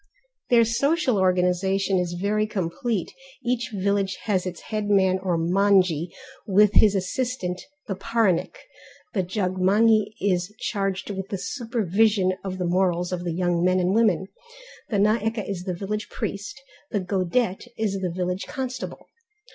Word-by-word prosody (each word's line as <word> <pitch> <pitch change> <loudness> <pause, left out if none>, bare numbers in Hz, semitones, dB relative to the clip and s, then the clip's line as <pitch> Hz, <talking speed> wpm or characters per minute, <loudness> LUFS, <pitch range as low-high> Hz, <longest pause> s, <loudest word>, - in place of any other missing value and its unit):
Their 235 -2 +6
social 260 - +1
organization 185 +1 +2
is 175 -1 -2
very 215 +2 +1
complete; 195 +1 -2 0.3
each 240 -1 0
village 200 -1 0
has 190 -4 0
its 180 -2 -6
headman 200 -3 +1
or 185 -3 0
manjhi, 180 -1 +3 0.4
with 205 +1 +5
his 205 -2 +5
assistant 190 -1 -2 0.2
the 205 - -3
paranik; 195 - 0 0.6
the 195 - +1
jogmanghi 200 +3 +2
is 185 0 0
charged 195 -2 -2
with 195 0 -5
the 195 - -2
supervision 215 -4 +1
of 190 -1 -4
the 180 - -2
morals 180 0 +1
of 180 -1 -3
the 175 -2 -2
young 175 -1 +1
men 185 +1 +3
and 180 +1 +1
women; 210 -5 +3 0.6
the 210 - 0
naeke 215 +1 +1
is 185 -3 -4
the 180 -2 -2
village 210 +4 -4
priest, 205 +6 -5 0.3
the 205 - 0
godet 190 +3 -1
is 205 -3 -1
the 185 -1 -1
village 180 +2 -3
constable. 260 -3 -5
195 Hz, 140 wpm, -24 LUFS, 180-215 Hz, 0.6 s, Their